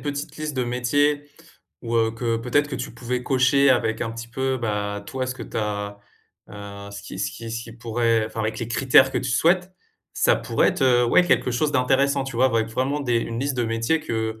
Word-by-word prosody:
petite 145 +1 -5
liste 155 -1 -4
de 125 - +1
métiers 145 +4 +1 0.5
ou, 115 -1 -1
heu, 115 0 +3
que 115 0 -1
peut-être 130 +6 +1
que 135 - -4
tu - - -5
pouvais 125 +1 -3
cocher 135 +1 +3
avec 115 -3 +1
un 115 - -2
petit 115 0 -8
peu, 130 +2 -1
bah, 105 -3 -3
toi 130 -1 -3
ce 125 - -3
que - - -8
tu - - -8
as, 105 -1 -3 0.5
heu, 100 0 -9
ce 100 0 -8
qui - - -9
ce - - -1
qui 115 0 -8
ce 115 +1 -4
qui 115 - -11
pourrait 115 -1 0
enfin, 110 - -6
avec 110 0 -2
les 115 - -4
critères 130 +2 +5
que - - +1
tu - - -3
souhaites, 180 +7 +2 0.4
ça - - +3
pourrait - - +1
être, - - -2
heu, 125 -2 +4
ouais 120 - +5
quelque 130 - +2
chose 145 +5 0
d'intéressant 135 +1 +2
tu 135 -3 -6
vois? 130 +2 +4
Avec 115 -3 0
vraiment 130 +5 -1
des 125 -4 0
une 115 0 -4
liste 140 -1 -1
de 120 - +1
métiers 115 +7 0
que, 110 -6 -3
120 Hz, 230 wpm, -23 LUFS, 115-135 Hz, 0.5 s, critères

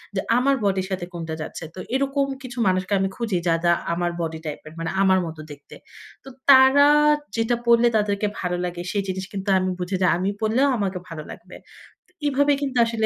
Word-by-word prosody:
যে 190 - 0 0.2
আমার 275 +2 +3
বডির 190 -2 0
সাথে 185 -2 -3
কোনটা 165 -2 -5
যাচ্ছে। 155 - -7
তো - - -8 0.2
এরকম 275 +1 +1 0.2
কিছু 250 -1 -9
মানুষকে 185 +1 0
আমি 195 - 0
খুঁজি 225 -6 -2
যারা 170 +1 +2 0.2
আমার 175 0 -1
বডি 160 -1 -4
টাইপের, 155 +1 -7
মানে 165 - -3
আমার 190 -1 +4
মত 160 -1 -7
দেখতে। 145 -1 -13 0.5
তো - - -11 0.2
তারা 265 +1 +7 0.5
যেটা 225 +1 +1
পড়লে 235 0 +5
তাদেরকে 205 0 0
ভালো 180 -1 -2
লাগে, 175 0 -5
সেই 200 -2 -1
জিনিস 190 0 -3
কিন্তু 195 0 -4
আমি 185 0 -1
বুঝি 180 +2 -2
যে 185 - +4
আমি 185 +2 -1
পড়লেও 230 +6 +2
আমাকে 190 -3 -2
ভালো 160 -2 -7
লাগবে। - - -12 0.7
এই 290 - +2
ভাবে 285 +1 +3
কিন্তু 270 -3 -2
আসলে 230 -1 -1
195 Hz, 195 wpm, -23 LUFS, 175-240 Hz, 0.7 s, তারা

